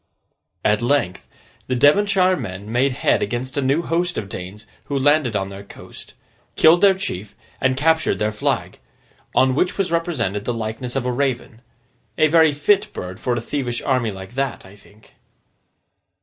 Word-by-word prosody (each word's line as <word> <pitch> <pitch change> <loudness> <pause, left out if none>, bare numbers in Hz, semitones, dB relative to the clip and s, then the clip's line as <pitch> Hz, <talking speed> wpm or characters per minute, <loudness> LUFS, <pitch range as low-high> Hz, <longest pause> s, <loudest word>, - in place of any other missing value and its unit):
At 105 +1 +3
length, 120 -7 0 0.4
the 130 - -1
Devonshire 185 +7 +4
men 100 - -7
made 130 +3 +2
head 125 - +1
against 120 +5 -3
a 140 - 0
new 140 +5 +1
host 175 +2 -1
of 100 - -4
Danes 95 +4 -8 0.2
who 140 - -2
landed 140 -4 +2
on 95 -1 -1
their 100 0 -9
coast; 100 - -13 0.4
killed 165 +2 +5
their 195 -1 +6
chief, 110 - -5 0.3
and 130 0 +1
captured 160 +2 +2
their 105 0 0
flag; 105 - -2 0.6
on 130 0 +4
which 180 +7 0
was 190 -3 -1
represented 135 - -1
the 120 - -1
likeness 115 +3 -5
of 135 -2 -1
a 125 - 0
Raven—a 125 +2 -3
very 160 -1 +5
fit 200 +9 +1
bird 90 +1 -7
for 125 - -1
a 120 - -2
thievish 120 -1 -3
army 130 -4 +1
like 95 +1 -9
that, 135 -4 -3
I 95 +1 -14
think. 105 +1 -22
130 Hz, 165 wpm, -21 LUFS, 110-155 Hz, 0.6 s, their